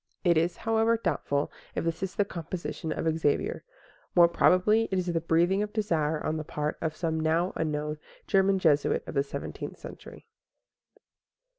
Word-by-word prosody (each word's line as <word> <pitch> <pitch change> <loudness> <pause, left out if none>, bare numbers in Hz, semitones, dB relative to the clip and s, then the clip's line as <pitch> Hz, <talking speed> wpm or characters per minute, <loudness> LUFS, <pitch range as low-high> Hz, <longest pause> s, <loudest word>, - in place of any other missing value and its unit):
It 175 -3 +4
is, 165 +2 +1
however, 225 +1 +2
doubtful 145 -9 -1 0.2
if - - -1
this 165 +1 -2
is 190 -1 -3
the 205 - +2
composition 170 -2 -5
of 165 - -2
Xavier; 145 -2 0 0.5
more 175 -1 +8
probably 195 +6 +4
it 190 - 0
is 180 - 0
the 170 -2 -1
breathing 170 +4 +2
of 210 0 -3
desire 160 -8 0
on 155 - 0
the 155 - -3
part 150 0 -3
of 155 -1 -2
some 160 -1 -1
now 165 +4 +1
unknown 150 -1 -2 0.3
German 195 0 +3
Jesuit 155 -6 +2
of - - -7
the 140 - +2
seventeenth 140 0 -6
century. - - -11
170 Hz, 165 wpm, -28 LUFS, 155-190 Hz, 0.5 s, more